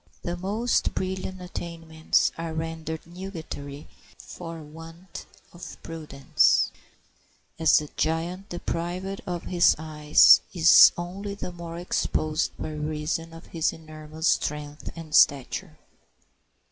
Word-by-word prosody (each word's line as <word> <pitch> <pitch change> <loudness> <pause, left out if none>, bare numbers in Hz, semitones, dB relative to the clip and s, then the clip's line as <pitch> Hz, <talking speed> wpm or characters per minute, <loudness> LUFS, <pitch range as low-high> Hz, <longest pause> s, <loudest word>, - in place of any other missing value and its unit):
The 175 - -3
most 205 +7 0
brilliant 185 0 -3
attainments 165 -3 -1
are 165 -1 -5
rendered 160 0 -5
nugatory 160 -5 -8 0.3
for 165 -2 -9
want 165 +4 -11 0.3
of 175 0 -10
prudence, 150 -4 +1 0.9
as 160 -1 +5
the 150 - -1
giant 170 +5 -2
deprived 175 +3 -4
of 175 -2 -3
his 175 -1 +4
eyes 150 -1 +6
is 165 -1 +8
only 195 +4 -5
the 190 - -6
more 170 -1 -8
exposed 155 -2 -1
by 155 - -5
reason 155 +2 -3
of 165 +1 -12
his 165 -2 +1
enormous 155 0 -6
strength 150 0 -1
and 165 -2 -9
stature. 150 +5 +3
165 Hz, 110 wpm, -26 LUFS, 155-175 Hz, 0.9 s, is